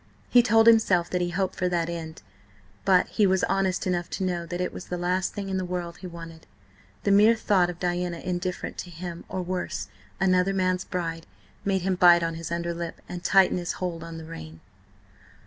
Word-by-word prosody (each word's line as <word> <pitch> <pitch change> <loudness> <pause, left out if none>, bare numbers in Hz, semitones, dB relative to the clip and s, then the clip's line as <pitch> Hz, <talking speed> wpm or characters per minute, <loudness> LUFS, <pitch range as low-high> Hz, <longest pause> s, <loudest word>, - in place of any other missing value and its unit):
He 245 - +8
told 225 -1 +4
himself 215 -7 +4
that 180 - 0
he 175 - 0
hoped 190 +2 -1
for 180 - -1
that 170 -2 0
end, 165 -2 -6 0.6
but 185 -2 +5
he 210 -3 +3
was 190 0 +2
honest 195 -1 0
enough 175 -1 -1
to - - -3
know 175 -2 -2
that 175 +1 -4
it 180 - -2
was - - -7
the 180 - -3
last 180 +1 -1
thing 200 -1 -4
in 190 -1 -2
the 185 - -1
world 175 -1 -4
he 185 - -8
wanted. 165 -2 -10 0.6
The 200 - +2
mere 210 +3 +6
thought 195 -5 +2
of 175 - -6
Diana 175 -1 -1
indifferent 180 +1 -4
to 180 - -6
him, 170 0 -7
or 185 - -3
worse, 180 0 -3 0.3
another 185 0 +2
man's 185 -1 0
bride, 165 -2 -4 0.4
made 190 -2 0
him 190 0 +1
bite 175 -1 +6
on 165 0 -1
his 165 0 -6
underlip 170 0 -3
and 175 0 -7
tighten 190 -1 +4
his 175 - -3
hold 170 -3 -4
on 165 0 -8
the 160 - -8
rein. 80 - -9
180 Hz, 205 wpm, -26 LUFS, 170-190 Hz, 0.6 s, He